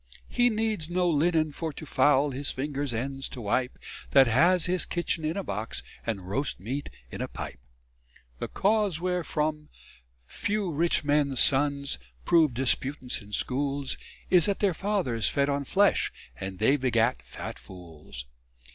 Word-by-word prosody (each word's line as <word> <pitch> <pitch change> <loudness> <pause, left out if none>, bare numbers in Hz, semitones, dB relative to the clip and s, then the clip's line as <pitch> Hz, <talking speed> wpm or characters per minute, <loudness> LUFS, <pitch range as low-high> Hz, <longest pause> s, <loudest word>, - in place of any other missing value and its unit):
He 245 0 +3
needs 215 -7 -1
no 180 0 +1
linnen 160 -1 +2
for 160 +2 -4
to 155 - -8
foul 140 +1 +3
His 140 +2 -1
fingers' 140 0 -2
ends 135 +4 -3
to - - -8
wipe, 125 +4 -1 0.3
That 135 -1 +7
has 160 +9 +4
his 180 0 0
kitchin 170 -2 -1
in 155 +4 -1
a 200 - -2
box, 105 - -4 0.2
And 105 -5 -2
roast 135 +9 -2
meat 130 +9 -4 0.2
in - - -5
a - - -1
pipe. - - -7 0.8
The - - -3
cause 205 -4 +1
wherefore 155 -4 -1 0.6
few 205 - -2
rich 165 +2 +2
men's 145 -3 +2
sons 140 0 +3 0.3
Prove 155 -7 +4
disputants 130 0 0
in 100 0 -14
schools, 140 +5 -1 0.4
Is 180 -3 +6
that 200 - +1
their 200 -3 +2
fathers 165 - 0
fed 140 0 +1
on 140 0 -1
flesh, 200 +7 +3 0.2
And 95 +3 -6
they 135 +8 +4
begat 125 -2 +1
fat - - -8
fools. 80 -9 -10
145 Hz, 155 wpm, -28 LUFS, 130-175 Hz, 0.8 s, That